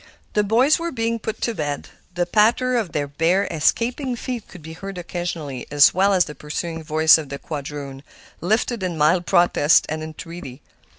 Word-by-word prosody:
The 210 Hz, -, +2 dB
boys 245 Hz, +10 st, +3 dB
were 340 Hz, 0 st, -3 dB
being 230 Hz, -2 st, -1 dB
put 220 Hz, 0 st, -5 dB
to 235 Hz, -, 0 dB
bed; 145 Hz, -6 st, -4 dB, 0.3 s
the 175 Hz, 0 st, +1 dB
patter 230 Hz, +7 st, +2 dB
of 220 Hz, -7 st, -1 dB
their 145 Hz, -1 st, -2 dB
bare, 165 Hz, +7 st, +1 dB
escaping 240 Hz, -, 0 dB
feet 240 Hz, -1 st, -5 dB
could 180 Hz, -4 st, -13 dB
be 160 Hz, +1 st, -8 dB
heard 195 Hz, +3 st, -8 dB
occasionally, 170 Hz, -7 st, -5 dB
as 145 Hz, 0 st, +6 dB
well 195 Hz, +2 st, +3 dB
as 185 Hz, -3 st, +3 dB
the 150 Hz, -, -8 dB
pursuing 165 Hz, +2 st, -5 dB
voice 155 Hz, +1 st, +5 dB
of 150 Hz, -3 st, -7 dB
the 140 Hz, -, -5 dB
quadroon, 140 Hz, -2 st, -7 dB, 0.4 s
lifted 220 Hz, +5 st, 0 dB
in 180 Hz, -3 st, -3 dB
mild 165 Hz, +4 st, +2 dB
protest 175 Hz, -4 st, +4 dB
and 155 Hz, +1 st, -3 dB
entreaty. 160 Hz, -3 st, -9 dB
175 Hz, 180 wpm, -22 LUFS, 150-220 Hz, 0.4 s, as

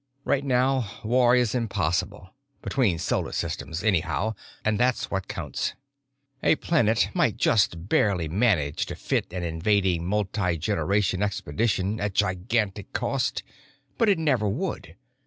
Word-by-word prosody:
Right 140 Hz, 0 st, +1 dB
now 130 Hz, -3 st, +1 dB
war 120 Hz, +2 st, +4 dB
is 125 Hz, -3 st, +2 dB
impossible—between 110 Hz, -, -2 dB
solar 85 Hz, -, -1 dB
systems, 80 Hz, +4 st, -3 dB
anyhow, 110 Hz, +2 st, +1 dB, 0.3 s
and 110 Hz, -1 st, +1 dB
that's 125 Hz, 0 st, +1 dB
what 95 Hz, -2 st, -2 dB
counts. -, -, -3 dB, 0.7 s
A -, -, +4 dB
planet 115 Hz, -10 st, +2 dB
might -, -, +1 dB
just 90 Hz, -4 st, +2 dB
barely 95 Hz, -6 st, +2 dB
manage 85 Hz, -6 st, +1 dB
to -, -, -5 dB
fit -, -, -2 dB
an 90 Hz, -1 st, -4 dB
invading 85 Hz, +1 st, +1 dB
multigeneration 95 Hz, -1 st, 0 dB
expedition 105 Hz, +1 st, -1 dB
at 105 Hz, -2 st, -2 dB
gigantic 100 Hz, +1 st, 0 dB
cost, -, -, -1 dB, 0.6 s
but 230 Hz, -, +4 dB
it 195 Hz, -, +4 dB
never 130 Hz, -10 st, +1 dB
would. 165 Hz, -, -4 dB
105 Hz, 120 wpm, -26 LUFS, 90-120 Hz, 0.7 s, war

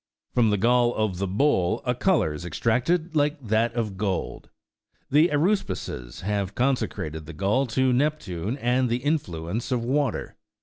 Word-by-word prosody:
From 120 Hz, -3 st, +3 dB
the 105 Hz, -, +2 dB
gall 120 Hz, +3 st, +3 dB
of 105 Hz, -5 st, -1 dB
the 100 Hz, -, -1 dB
bull 100 Hz, -2 st, +1 dB
a 125 Hz, -, +2 dB
colour 125 Hz, -, +2 dB
is 75 Hz, -, -7 dB
extracted 125 Hz, -, 0 dB
like 150 Hz, +1 st, +2 dB
that 115 Hz, -1 st, +1 dB
of 110 Hz, -5 st, -2 dB
gold. 95 Hz, -3 st, -3 dB, 0.6 s
The 150 Hz, +4 st, +6 dB
aruspices 150 Hz, -, -1 dB
have 100 Hz, 0 st, -2 dB
consecrated 100 Hz, -, -1 dB
the 80 Hz, -, -8 dB
gall 100 Hz, -, +1 dB
to 130 Hz, +2 st, +2 dB
Nep 150 Hz, +4 st, +1 dB
tune 95 Hz, -, -4 dB
and 125 Hz, 0 st, +1 dB
the 120 Hz, -, +1 dB
influence 110 Hz, -, -2 dB
of 120 Hz, -2 st, 0 dB
water. 135 Hz, -1 st, -1 dB
120 Hz, 160 wpm, -25 LUFS, 95-140 Hz, 0.6 s, The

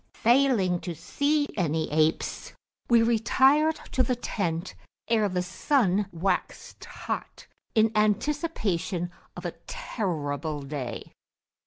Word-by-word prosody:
Failing 235 Hz, -8 st, +4 dB
to 175 Hz, -1 st, -5 dB
see 290 Hz, -, 0 dB
any 160 Hz, -5 st, 0 dB
apes, 155 Hz, +1 st, 0 dB, 0.4 s
we 235 Hz, -1 st, +6 dB
retired 265 Hz, +7 st, +4 dB, 0.2 s
to 260 Hz, -, +1 dB
the 255 Hz, 0 st, +2 dB
tent 180 Hz, -7 st, -3 dB, 0.3 s
ere 220 Hz, -3 st, +2 dB
the 180 Hz, -1 st, -1 dB
sun 200 Hz, -, +1 dB
waxed 180 Hz, +2 st, -2 dB
hot, -, -, -6 dB, 0.3 s
in 220 Hz, 0 st, +4 dB
anticipation 210 Hz, -, 0 dB, 0.3 s
of -, -, -7 dB
a -, -, -3 dB
terrible 155 Hz, -, -3 dB
day. 135 Hz, -3 st, -5 dB
200 Hz, 110 wpm, -27 LUFS, 170-250 Hz, 0.4 s, we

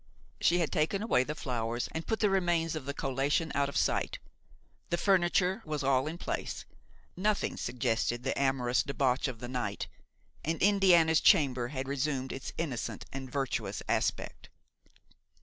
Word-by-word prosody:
She 175 Hz, -, +3 dB
had 170 Hz, -3 st, 0 dB
taken 170 Hz, +5 st, 0 dB
away 130 Hz, -, +3 dB
the 150 Hz, +3 st, -4 dB
flowers 120 Hz, -4 st, -2 dB
and 160 Hz, 0 st, -5 dB
put 220 Hz, -2 st, -1 dB
the 210 Hz, -, +4 dB
remains 175 Hz, -4 st, +1 dB
of 155 Hz, -4 st, -5 dB
the 140 Hz, -, -3 dB
collation 140 Hz, +4 st, 0 dB
out 140 Hz, 0 st, +1 dB
of -, -, -3 dB
sight; -, -, +1 dB, 0.7 s
the 170 Hz, -, +1 dB
furniture 185 Hz, +2 st, +2 dB
was 150 Hz, -2 st, -3 dB
all 135 Hz, 0 st, +2 dB
in 160 Hz, +2 st, -4 dB
place, -, -, -4 dB, 0.5 s
nothing 210 Hz, +2 st, 0 dB
suggested 120 Hz, 0 st, -1 dB
the 135 Hz, -, -1 dB
amorous 130 Hz, -3 st, +2 dB
debauch 135 Hz, -1 st, 0 dB
of 125 Hz, -4 st, -6 dB
the 120 Hz, -, -6 dB
night, 125 Hz, 0 st, -3 dB, 0.6 s
and 165 Hz, +2 st, -1 dB
Indiana's 175 Hz, -6 st, +5 dB
chamber 135 Hz, -, +4 dB
had 130 Hz, 0 st, -4 dB
resumed 135 Hz, -1 st, -1 dB
its 135 Hz, -, -6 dB
innocent 140 Hz, -8 st, -3 dB
and 135 Hz, -1 st, -6 dB
virtuous 135 Hz, -2 st, -2 dB
aspect. -, -, -1 dB
140 Hz, 155 wpm, -31 LUFS, 130-170 Hz, 0.7 s, Indiana's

